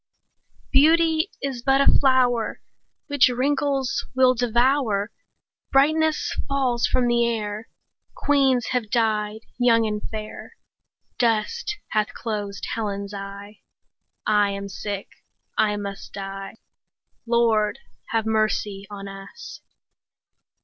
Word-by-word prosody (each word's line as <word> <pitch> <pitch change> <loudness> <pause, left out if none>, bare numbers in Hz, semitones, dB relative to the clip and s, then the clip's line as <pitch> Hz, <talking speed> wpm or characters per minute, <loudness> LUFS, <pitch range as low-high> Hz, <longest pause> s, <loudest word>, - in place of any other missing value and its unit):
Beauty 320 +4 +4
is 265 -3 -3
but 270 +2 +3
a 275 - +4
flower 250 -4 +3 0.4
15 - - -51
Which 285 -3 +5
wrinkles 275 -1 0
will 255 -1 +5
devour; 240 -3 +1 0.6
Brightness 310 +3 +2
falls 260 -4 +1
from 250 - +1
the 240 0 +3
air; 215 -1 -4 0.5
Queens 270 -4 +2
have 245 -4 -1
died 215 -2 0 0.2
young 230 -2 +4
and 210 -1 -2
fair; 215 -1 -8 0.6
Dust 245 - 0
hath 215 0 -1
closed 205 -3 -4
Helen's 200 -2 -3
eye; 200 +1 -8 0.7
I 210 -1 +3
am 200 0 -5
sick, 200 0 -5 0.5
I 210 -1 +2
must 200 -1 -7
die— 195 0 -6 0.7
20 - - -37
Lord, 230 -3 +2 0.3
have 225 -1 0
mercy 215 -2 0
on 200 -1 -7
us! 195 - -10
225 Hz, 110 wpm, -24 LUFS, 210-260 Hz, 0.7 s, Which